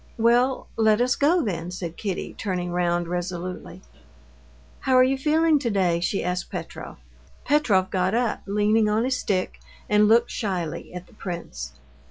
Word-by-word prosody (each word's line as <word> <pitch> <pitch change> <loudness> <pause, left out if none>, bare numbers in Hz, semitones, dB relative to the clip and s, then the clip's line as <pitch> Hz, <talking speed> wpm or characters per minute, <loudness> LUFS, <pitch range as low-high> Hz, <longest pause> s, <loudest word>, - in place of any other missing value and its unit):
"Well, 240 +3 +3
let 220 -1 +4
us 245 0 +2
go, 330 +5 +3
then," 175 -5 -3
said 175 -2 -6
Kitty, 195 -4 -4
turning 180 -4 -3
round 175 -1 0
resolutely. 180 +1 -5 1.0
"How 260 -1 +1
are 255 - +7
you 265 +1 +2
feeling 310 +2 +3
today?" 195 -9 +1
she 175 +3 -1
asked 180 0 -2
Petrov. - - -7 0.5
Petrov 215 -10 +2
got 185 +2 +1
up, 240 -2 0
leaning 210 +2 +2
on 215 +2 +1
his 255 0 0
stick, 185 -3 -2 0.3
and 210 0 +4
looked 230 +2 +4
shyly 180 -7 -3
at 180 0 -8
the - - -22
prince. 120 - -6
200 Hz, 155 wpm, -24 LUFS, 180-240 Hz, 1.0 s, are